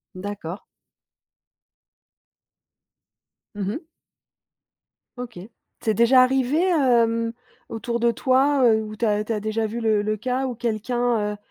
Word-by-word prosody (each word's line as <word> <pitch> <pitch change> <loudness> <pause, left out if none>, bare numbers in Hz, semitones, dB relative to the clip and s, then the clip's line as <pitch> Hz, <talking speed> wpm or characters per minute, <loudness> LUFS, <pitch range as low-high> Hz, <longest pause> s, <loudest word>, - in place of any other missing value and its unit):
D'accord. 190 -1 -6 2.9
Mmh 200 -2 -3
mh. 310 +8 -6 1.3
OK. 245 -5 -7 0.4
C'est 220 - +1
déjà 245 +4 +5
arrivé, 265 +2 +1
hem, 235 -9 +2 0.4
autour 235 +1 -3
de 235 0 +3
toi, 265 +3 +2
heu, 220 -2 +4
où 215 0 -8
tu 235 - 0
as 210 -1 +1
tu 220 - -6
as 215 - 0
déjà 215 +1 -2
vu 220 +2 -4
le 220 -2 +2
le 215 +1 -1
cas 255 +4 -2
où 250 -2 -3
quelqu'un, 230 -1 -1
heu, 210 - -9
230 Hz, 130 wpm, -23 LUFS, 215-250 Hz, 2.9 s, déjà